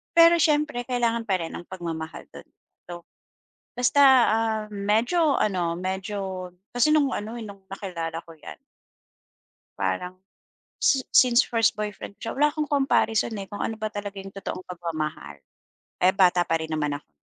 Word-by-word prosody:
Pero 335 0 +8
siyempre 300 -5 +1
kailangan 235 -2 0
pa 190 -2 +1
rin 165 - -5
ang - - -7
pagmamahal 165 -3 -6
do'n. - - -12 0.4
So, 175 -1 -8 0.7
basta, 250 +4 +3 0.7
uhm, - - -8
medyo 275 +8 +3
ano, 175 -5 0
medyo 190 0 -4 0.3
kasi 245 +4 +4
no'ng 285 -3 +3
ano, 220 +3 -4
eh, 230 - -6
no'ng 200 -2 -12
nakilala 165 -4 -5
ko 165 - -13
yan. - - -10 1.2
Parang 100 - -2 0.7
si 270 -2 +3
since 245 0 +6
first 230 -2 +2
boyfriend 210 -1 -6
ko - - -48
siya, - - -5
wala 295 +1 +5
akong 300 -2 -2
comparison, 235 -5 +2
eh, 195 - -5
kung 205 - -7
ano 225 - -2
ba 215 0 -3
talaga 205 -1 -6
yung 195 0 -8
totoong 185 -1 -6
pagmamahal. 155 - -5 0.7
Eh, 185 +1 +5
bata 180 -2 +4
pa 165 - +2
rin 160 0 -5
naman 150 -2 -1
ako, - - -29
200 Hz, 160 wpm, -25 LUFS, 175-240 Hz, 1.2 s, Pero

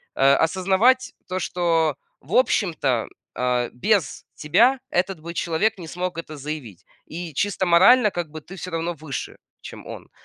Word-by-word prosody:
а, 135 +1 +5
осознавать 195 +9 +2
то, 185 0 -3
что, 165 -5 +1 0.3
в 155 +10 -10
общем-то, 160 - +1 0.3
а, 125 -1 0
без 185 - 0
тебя 235 - +3
этот 180 -1 -1
бы 170 +2 -8
человек 175 +6 0
не 170 -3 -9
смог 180 +1 -4
это 155 -2 -7
заявить, 140 - -7 0.2
и 170 -1 -7
чисто 200 +4 0
морально, 200 +6 +6
как 175 -3 -4
бы, 155 - -8
ты 185 +6 -12
всё 185 -1 -7
равно 165 +1 -2
выше, 155 -3 -6 0.2
чем - - -10
он. - - -9
170 Hz, 160 wpm, -23 LUFS, 155-190 Hz, 0.3 s, морально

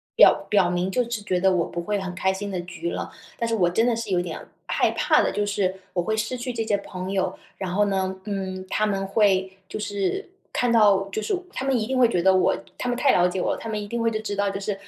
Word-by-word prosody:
表 - - +6
表 195 -4 +4
明， 180 +1 0
就 250 - +2
是 230 -3 -3
觉 185 -3 0
得 190 +1 +4
我 175 -2 +2
不 170 - -5
会 205 +3 -1
很 185 -2 -5
开 190 0 +1
心 200 +1 -5
的 185 - -2
局 170 -1 -5
了。 - - -4 0.3
但 230 - -1
是 230 - 0
我 175 -5 +3
真 225 +6 +2
的 240 -2 +2
是 225 -2 -4
有 175 -1 +2
点 170 -3 -5 0.3
害 - - +2
怕 - - +3
的， - - +1
就 205 0 0
是， 200 -2 0 0.2
我 180 - +1
会 220 +5 0
失 220 +4 -2
去 245 +1 -4
这 230 -1 -1
些 215 -2 +1
朋 185 -1 -6
友。 190 -1 -1 0.2
然 185 -2 -4
后 205 +1 +3
呢， 190 -1 -1
嗯， 190 -2 -4
他 215 - +1
们 195 -1 -1
会 195 -2 +2 0.2
就 - - -5
是 205 - -2 0.3
看 245 -1 +1
到 200 -4 +5
就 215 - -3
是 390 - 0 0.2
他 265 - -3
们 270 -2 +2
一 215 - -1
定 260 +2 -1
会 245 -2 +6
觉 180 -6 0
得 190 0 +6
我 185 - +3 0.2
他 250 - -3
们 245 - -1
太 265 +2 +4
了 180 0 +4
解 180 +1 -2
我， - - 0
他 - - -7
们 215 -1 -2
一 205 - -5
定 235 +2 -2
会 230 - +3
就 215 -1 -2
知 205 -2 -3
道 200 0 +1
就 195 0 -4
是， 205 +1 -1
200 Hz, 300 characters per minute, -24 LUFS, 185-220 Hz, 0.3 s, 表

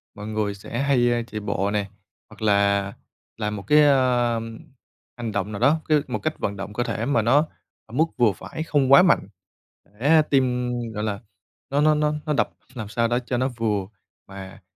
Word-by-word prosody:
mọi 105 +1 -8
người 110 -2 -2
sẽ 110 +4 -6
hay 120 -4 +2
chạy 105 +1 -5
bộ 100 -1 -1
nè 105 -1 -1 0.4
hoặc - - -16
là 100 -1 +2 0.4
làm 105 -1 -2
một 100 - -7
cái, 150 0 +6
ờm, 120 -5 +1 0.6
hành 120 -2 -4
động 105 0 -2
nào 100 - -5
đó, 140 +6 +3
cái 150 -1 +4
một - - -3
cách 155 0 -3
vận 100 - -2
động 100 +1 -7
cơ 120 - -1
thể 115 -1 -3
mà 125 -3 +2
nó 140 +8 +3 0.4
ở 110 - -17
mức 155 +6 +3
vừa 120 -4 +4
phải 100 - -7
không 145 -4 +1
quá 140 - +9
mạnh. 170 - +3 0.7
Để 155 +4 +5
tim, 125 -3 +1 0.2
gọi 105 0 -3
là 105 -2 -3 0.5
nó 140 +1 +1
nó 155 +1 +4
nó 150 0 +1
nó 150 - 0
đập 145 - +1 0.2
làm 110 -5 -6
sao 115 +2 0
đó 120 +1 +1
cho 125 0 -3
nó 130 +1 +1
vừa 110 -6 -2 0.4
mà 95 -1 -10
120 Hz, 200 wpm, -23 LUFS, 105-140 Hz, 0.7 s, quá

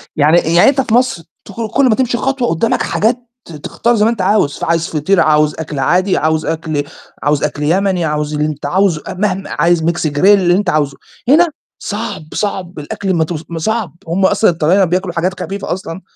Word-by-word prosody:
يعني 155 +3 +4 0.2
يعني 175 - +6
أنت 275 -1 +1
في 230 - -3
مصر 245 -9 +1 0.2
تخرج 220 +2 -5
كلّ 275 +4 +2
ما 215 - +3
تمشي 250 -2 0
خطوة 270 -2 -1
قدّامك 170 +8 0
حاجات 230 +4 +1 0.3
ت - - -13
تختار 230 +10 -1
زي 210 0 +2
ما 230 - +3
أنت 215 -5 -3
عاوز، 185 -7 +1
فعايز 165 0 0
فطير 165 +5 0
عاوز 150 -1 +3
أكل 150 -3 -5
عادي 185 +7 +2
عاوز 155 0 0
أكل 155 -2 -2 0.4
عاوز 145 0 +1
أكل 150 0 -2
يمني 180 +1 +1
عاوز 150 0 -2
اللي 150 0 0
أنت 150 -1 -5
عاوزه 175 0 +1
مهما 195 0 -2
عايز 170 -1 +1
Mix 165 -1 0
grill 145 - -7
اللي 195 -4 +5
أنت 200 -1 0
عاوزه، 145 -4 0 0.3
هنا 330 +5 +6 0.3
صعب، 205 -5 -5
صعب 185 -5 -3
الأكل 190 +6 -3
ما 165 -2 +2
تو 170 +2 -4 0.2
صعب، 220 +2 -2
هُم 190 +3 +1
أصلًا 215 - +3
الطلاينة 175 +3 +2
بياكلوا 180 +1 -1
حاجات 180 +3 -2
خفيفة 200 -2 -4
أصلًا، 185 -1 -7
175 Hz, 195 wpm, -15 LUFS, 155-205 Hz, 0.4 s, يعني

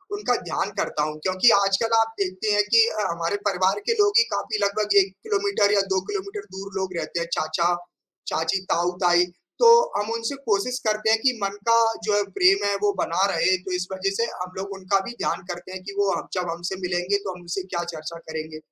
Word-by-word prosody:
उनका 410 - 0
ध्यान - - -1
करता 150 - -1
हूँ 155 0 -3
क्योंकि 185 +5 +4
आजकल 200 +3 +3
आप 225 0 +1
देखते 190 +2 -1
हैं 205 0 +4
कि 230 0 +6
अ, 215 - -3
हमारे 170 +3 -2
परिवार 190 +1 +1
के 460 - +3
लोग 410 0 +3
ही 465 - +6
काफ़ी 215 - -2
लगभग 205 0 0
1 190 - -9
किलोमीटर 400 - +1
या 200 - +4
2 190 - +1
किलोमीटर 410 0 -5
दूर 195 +1 -7
लोग 190 -2 -3
रहते 165 +1 -3
हैं 170 - -3
चाचा-चाची, 175 +1 -2
ताऊ-ताई 175 0 +2 0.3
तो 470 - +7 0.3
हम 205 +2 -2
उनसे 230 +4 -3
कोशिश 220 +5 +1
करते 215 +1 +1
हैं 225 - +4
कि 265 - +4
मन 200 0 -1
का 230 0 +6 0.3
जो 210 0 0
है 205 - +3
प्रेम 195 +2 +4
है 200 0 +1
वो 205 -1 +3
बना 180 +2 +1
रहे। 185 - +3
तो 185 - -6
इस 180 0 -2
वज़ह 190 +1 -1
से 230 - +1 0.2
हम 180 0 -5
लोग 195 +1 -5
उनका 195 +1 0
भी 240 - -5
ध्यान - - -1
करते 175 +1 -8
हैं, 190 - -7
कि 200 - -7
वो 200 -1 0
जब 180 -2 -2
हमसे 175 +3 -4
मिलेंगे 180 +2 0
तो 195 - -3
हम 180 - -12
उनसे 175 +2 -4
क्या 180 -2 -3
चर्चा 155 +1 -7
करेंगे? 160 0 -6
195 Hz, 215 wpm, -24 LUFS, 180-215 Hz, 0.3 s, तो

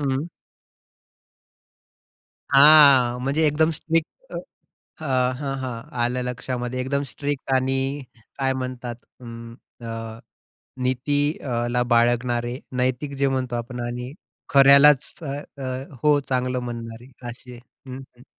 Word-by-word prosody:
हं. 135 +1 -1 2.3
हां, 140 -4 +7
म्हणजे 145 +4 +1
एकदम 155 +2 +2
स्ट्रिक्ट 165 +1 -1 0.9
अ, - - -6 0.3
हं, 135 -1 -3
हं., 120 -3 -6
आलं 125 +1 0
लक्षामध्ये. 125 0 -4
एकदम 140 +2 -1
स्ट्रिक्ट 140 +2 -4
आणि 130 +1 +1 0.6
काय 135 -1 +1
म्हणतात. 125 -2 -5 0.3
अं, 115 -1 -9 0.3
अ, 115 -1 -6 0.6
नीती 130 +3 0 0.4
अला 120 +1 0
बाळगणारे 120 +1 +1 0.2
नैतिक 130 +3 -1
जे 140 0 +2
म्हणतो 130 -2 -2
आपण 120 +1 -5
आणि 125 +1 -5 0.4
खऱ्यालाच 140 0 +6
अ, 140 - -4 0.3
अ, - - -4 0.4
हो, 150 -1 +5
चांगलं 125 -1 0
म्हणणारे 120 0 -7 0.2
असे. 125 +1 -10 0.3
हं, 130 0 -7 0.2
हं. 120 - -17
130 Hz, 110 wpm, -23 LUFS, 120-140 Hz, 2.3 s, हां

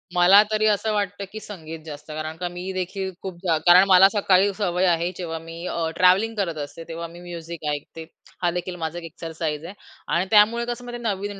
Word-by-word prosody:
मला 180 +3 +7
तरी 215 0 +2
असं 215 +1 +1
वाटतं, 205 -1 -2
की 215 - -7
संगीत 165 -7 -9
जास्त 150 -1 -9
कारण 155 +1 -5
का 180 - -3
मी 180 +2 -6
देखील 190 +1 -3
खूप 190 -2 -6
जा 165 -4 +2
कारण 180 +1 +8
मला 190 0 +8
सकाळी 200 -1 +3
सवय 185 -3 +1
आहे 170 0 +1
जेव्हा 165 -3 -4
मी 165 +1 -9
अ, 165 -1 -2
ट्रॅव्हलिंग 195 +5 +4
करत 175 -6 -2
असते 165 +3 -9
तेव्हा 170 0 -5
मी 170 +1 -13
म्युझिक 170 -2 -8
ऐकते. 160 +2 -6 0.4
हा 175 - +3
देखील 180 +1 -4
माझा 165 -1 -4
एक 175 - -7
एक्सरसाइज 160 -1 -5
आहे 185 - -8 0.4
आणि 175 +2 +2
त्यामुळे 220 +3 +5
कसं 240 0 -5
म्हणजे 240 0 -7
नवीन 205 -2 -3
180 Hz, 205 wpm, -23 LUFS, 165-200 Hz, 0.4 s, कारण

